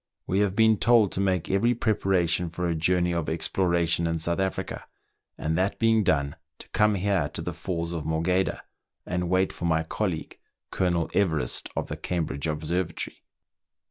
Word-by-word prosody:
We 95 - 0
have 100 -2 +1
been 110 -1 +5
told 115 -4 +4
to - - -3
make 95 -3 0
every 115 +6 +2
preparation 90 -6 +1
for 90 +1 -3
a 85 - +1
journey 90 +2 +1
of 85 -2 -1
exploration 85 0 +1
in 80 0 0
South 85 +3 -1
Africa, 95 0 -3 0.5
and 80 +1 -1
that 95 +4 0
being 115 -1 +3
done, 70 -5 +1 0.2
to - - -12
come 105 0 +3
here 95 -5 +1
to - - -1
the - - -3
Falls 85 -2 -3
of 80 -3 -3
Morgheda 85 +4 0 0.4
and 90 -1 -2
wait 95 +1 +2
for - - -5
my 80 -1 +2
colleague. 85 0 -3 0.3
Colonel 85 -3 +1
Everest, 80 -7 0
of - - -1
the - - -6
Cam 85 -3 -2
bridge 70 +1 -4
Observatory. 80 +4 -3
90 Hz, 175 wpm, -26 LUFS, 80-95 Hz, 0.5 s, been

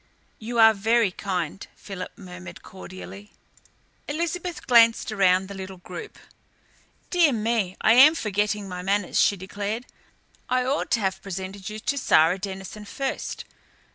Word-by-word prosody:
"You 235 +2 -5
are 225 -1 +8
very 220 0 +2
kind," 185 -2 -4
Philip 190 -3 -8
murmured 185 -1 -10
cordially. 190 +2 -11 0.7
Elizabeth 340 +3 -3
glanced 230 -2 +5
around 190 -2 +3
the 200 - -8
little 190 -1 -8
group. 175 -1 -9 0.9
"Dear 345 -5 +4
me, 220 -5 -1
I 220 - +5
am 280 +6 +8
forgetting 210 -3 -1
my 180 -1 -6
manners," 195 0 0
she 200 - +4
declared. 205 +5 -4 0.6
"I 255 0 +1
ought 275 +3 -1
to 235 - +2
have 190 -1 -1
presented 190 +1 -6
you 215 - -6
to 280 +6 -2
Sara 165 -3 +4
Denison 195 +2 -7
first. 270 +6 -4
205 Hz, 140 wpm, -25 LUFS, 190-230 Hz, 0.9 s, are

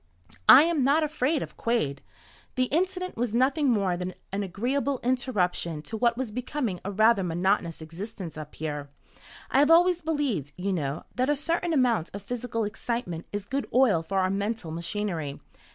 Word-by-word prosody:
"I 275 - +11
am, 325 -4 +1
not 290 +5 +4
afraid 300 -1 0
of - - -10
Quade. 150 -13 0 0.5
The 255 - +2
incident 365 0 -1
was 230 -1 -1
nothing 270 +3 +3
more 200 -6 +2
than 180 +1 -5 0.2
an 195 +1 -1
agreeable 250 +8 -1
interruption 195 - 0
to 225 - -6
what 235 +1 +2
was 255 -4 -3
becoming 245 -4 -3
a 200 - -3
rather 215 +1 +4
monotonous 175 -1 0
existence 175 +1 -7
up 155 -1 -8
here. 145 -2 -4 0.6
I 265 - +4
have 290 +2 +5
always 350 +1 +5
believed, 275 - -1
you 190 +2 -1
know, 145 -3 -2
that 255 +2 0
a 295 - +3
certain 335 +4 -1
amount 250 - +2
of 200 - -7
physical 230 0 -3
excitement 210 -5 -4
is 205 -1 -4
good 275 +5 -2
oil 240 -10 +5
for 195 +4 -3
our 185 0 +2
mental 200 -3 -2
machinery. 170 -3 -3
220 Hz, 170 wpm, -27 LUFS, 180-265 Hz, 0.6 s, I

